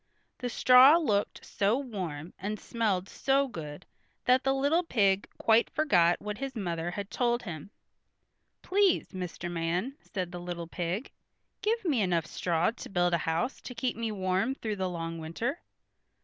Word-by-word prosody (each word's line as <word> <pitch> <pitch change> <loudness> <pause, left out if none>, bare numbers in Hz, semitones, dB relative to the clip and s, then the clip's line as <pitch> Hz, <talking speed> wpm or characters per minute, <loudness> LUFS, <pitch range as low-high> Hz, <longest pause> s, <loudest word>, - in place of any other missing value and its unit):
The 250 - -2
straw 255 +6 +7
looked 210 -12 0
so 205 +4 +1
warm, 185 - -5
and 210 +2 -3
smelled 205 -5 -1
so 275 +5 +1
good 150 - -8 0.4
that 255 +1 +4
the 270 - +2
little 285 +5 +2
pig 200 - +1
quite 225 +1 +4
forgot 180 - +3
what 210 +1 -5
his 270 -1 -4
mother 175 -5 -2
had 200 +2 -5
told 240 -1 +1
him. 170 -4 -7 0.9
"Please, 390 -1 +2
Mr. 180 -2 -5
Man," 175 +10 -1
said 180 -2 -5
the 175 - -6
little 175 -1 -5
pig, 175 +7 -3 0.5
"give 445 0 0
me 280 -9 +2
enough 175 -4 +1
straw 170 +2 0
to 235 - -10
build 175 -2 +1
a 170 - +3
house 170 +11 -1
to 250 - -8
keep 245 +2 -1
me 230 -1 -2
warm 190 +5 0
through 215 -5 -4
the 190 -1 -1
long 165 -1 -4
winter." 225 - -3
200 Hz, 165 wpm, -29 LUFS, 175-255 Hz, 0.9 s, straw